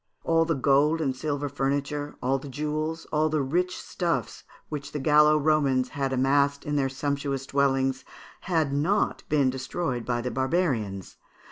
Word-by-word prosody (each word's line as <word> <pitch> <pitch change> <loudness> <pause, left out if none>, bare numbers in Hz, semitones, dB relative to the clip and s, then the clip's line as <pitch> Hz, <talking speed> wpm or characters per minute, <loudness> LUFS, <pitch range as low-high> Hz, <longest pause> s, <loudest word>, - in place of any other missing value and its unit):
All 165 0 +3
the 165 -1 0
gold 140 +4 +3
and 135 -5 -1
silver 145 +1 -2
furniture, 145 +1 -2
all 135 +2 +1
the 140 - -9
jewels, 155 +3 -3
and - - -22
all 155 +1 +2
the 155 -2 0
rich 180 +7 0
stuffs 170 -2 -3 0.2
which 145 -2 -6
the 150 - -2
Gallo 150 +2 +5
Romans 140 -4 +2
had 135 -3 -2
amassed 140 +2 +2
in 145 - -2
their 135 -2 +1
sumptuous 140 0 -2
dwellings, 135 -1 +1 0.5
had 160 -5 +1
not 165 +9 +1
been 140 -4 +3
destroyed 130 -1 -3
by 120 0 -1
the 125 +1 -3
barbarians. 130 - -1
140 Hz, 160 wpm, -26 LUFS, 135-155 Hz, 0.5 s, Gallo